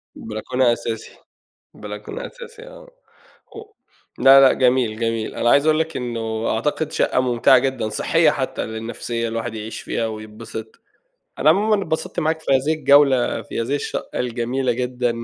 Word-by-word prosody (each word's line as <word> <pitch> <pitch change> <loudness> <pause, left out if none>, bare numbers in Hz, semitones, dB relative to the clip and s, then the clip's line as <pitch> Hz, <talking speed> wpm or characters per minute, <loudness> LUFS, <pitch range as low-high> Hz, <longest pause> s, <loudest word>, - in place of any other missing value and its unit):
بلكونة 120 +3 0
أساسي، 115 -1 -5 0.6
بلكونة 105 - -7
أساسي 480 -2 -12
آه، - - -13 0.7
هُ 440 - -8 0.6
لا 135 0 +8
لأ، 135 - +6
جميل، 125 -4 +1
جميل، 115 -1 -2
أنا 120 - +1
عايز 140 +2 +4
أقول 155 0 +3
لك 160 0 -2
إنّه 115 -2 -3
أعتقد 150 +6 -1
شقّة - - +1
ممتعة 125 0 +4
جدًا 130 -4 -2
صحية 105 - +2
حتّى - - -3
للنفسية 115 +1 -4
الواحد 115 0 -4
يعيش 110 +1 -6
فيها 115 - -2
ويتبسط، 110 0 -9 0.6
أنا 150 - +5
عمومًا 205 +4 +2
اتبسطت 160 0 -3
معاك 160 0 0
في 155 - -1
هذه 135 +4 +2
الجولة، 140 -3 +3
في - - -5
هذه 135 +5 -2
الشقّة - - -4
الجميلة 125 +1 -1
جدًا 125 -1 -2
125 Hz, 150 wpm, -21 LUFS, 115-145 Hz, 0.7 s, لا